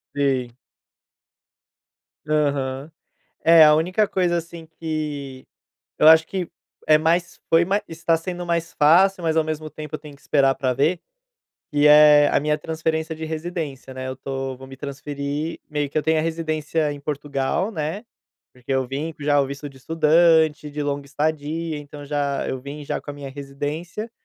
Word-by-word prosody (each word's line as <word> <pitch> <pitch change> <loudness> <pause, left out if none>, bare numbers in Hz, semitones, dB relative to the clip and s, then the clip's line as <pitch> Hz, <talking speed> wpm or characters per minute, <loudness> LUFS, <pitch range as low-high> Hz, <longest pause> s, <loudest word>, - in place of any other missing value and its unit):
Sim. 130 -4 0 1.8
Aham. 140 -1 -1 0.5
É, 165 0 +8
a 150 0 +7
única 185 +6 +1
coisa, 175 -2 +1
assim, 170 0 -7
que 150 -5 -4 0.5
eu 155 - +5
acho 160 0 +8
que 185 -3 -4 0.4
é 155 0 +7
mais 170 +2 0
foi 165 +1 +5
mais 200 +4 0
está 165 0 0
sendo 175 +1 -5
mais 170 -1 -2
fácil, 175 +4 +4
mas 160 0 +1
ao 160 - +4
mesmo 155 0 -4
tempo 150 -1 -7
eu - - -8
tenho 150 -1 -12
que 140 - -24
esperar 135 -2 +3
pra 130 -2 0
ver, 155 +7 +1 0.7
que 145 0 +4
é 150 -1 +8
a - - +2
minha 150 +1 0
transferência 160 +1 -2
de 160 - -8
residência, 155 -5 -5
né, 130 0 -6
eu 130 - -4
tô 135 0 -5
vou 130 - -11
me 135 - -10
transferir, 140 +2 -5
meio 150 -2 -2
que - - -3
eu 155 - +1
tenho 160 0 +2
a - - +1
residência 155 -1 -1
em 145 - -7
Portugal, 145 +6 -2
né, 165 +3 -4 0.5
porque 125 +1 -8
eu 130 0 +1
vim 150 +5 -4
com 145 - -11
já 145 0 +3
o 140 - +2
visto 140 +2 -7
de 135 - -17
estudante, 160 0 +3
de 145 +1 -4
longa 140 -1 -3
estadia, 155 +2 -2
então 145 0 -10
já 140 -1 -1
eu 130 - -3
vim 145 +3 -8
já - - -3
com 145 - -8
a - - -10
minha 140 -1 -8
residência, 145 - -6
150 Hz, 180 wpm, -22 LUFS, 140-160 Hz, 1.8 s, É